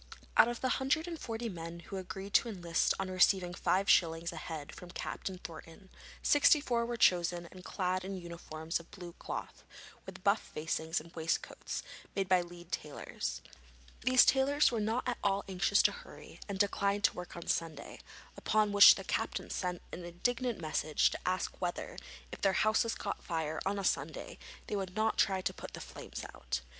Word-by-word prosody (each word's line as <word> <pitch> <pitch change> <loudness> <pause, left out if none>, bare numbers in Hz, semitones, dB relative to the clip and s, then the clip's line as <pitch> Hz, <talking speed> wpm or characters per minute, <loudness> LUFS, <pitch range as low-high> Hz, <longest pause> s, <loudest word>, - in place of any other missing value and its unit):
Out - - +8
of 240 0 -3
the 260 - +1
hundred 300 +5 +1
and 335 -2 -5
forty 230 -1 -4
men 170 -3 -6
who 195 - -7
agreed 190 +2 -6
to 235 - +4
enlist 175 -5 +1
on 190 -1 -2
receiving 185 -1 +3
five 190 +2 +1
shillings 165 0 +3
a - - -8
head 155 -1 -6
from 180 - -10
Captain 185 +1 -5
Thornton, 170 +1 -11 0.3
sixty 290 +1 +6
four 235 -5 0
were 240 0 -3
chosen 175 -3 +3
and 185 -1 -12
clad 185 -1 -1
in 195 0 -4
uniforms 170 -2 -4
of 170 - -14
blue 175 -3 -9
cloth, - - -6 0.4
with - - -9
buff - - +3
facings 160 +1 -2
and 165 +2 -14
waistcoats, 160 0 -3 0.3
made 195 -1 0
by 185 -1 +4
Leeds 175 0 -11
tailors. 150 -1 -5 0.6
These 255 +1 +6
tailors 275 +2 +4
were 230 - -1
not 220 +5 -1
at 245 - -1
all 200 0 +2
anxious 190 +2 +3
to - - +5
hurry, - - -12
and 200 - -3
declined 200 0 +1
to - - +4
work 180 -1 -8
on 170 - -7
Sunday, 160 -4 -2 0.4
upon 215 -1 +2
which 205 0 +10
the - - -6
captain - - -2
sent 180 -2 -3
an 175 - -6
indignant 235 +7 -1
message 155 -1 +1
to - - -4
ask 185 0 -1
whether, 175 -1 -3 0.4
if - - -8
their 195 -1 +3
houses 215 +3 +2
caught 200 - -4
fire 160 -2 -2
on 200 +1 0
a 200 - -2
Sunday, - - -2 0.3
they - - -3
would 190 -2 -3
not 220 +1 +1
try 190 -2 +3
to - - -1
put - - -9
the - - -7
flames - - -8
out? 65 +1 -3
185 Hz, 185 wpm, -33 LUFS, 170-215 Hz, 0.6 s, which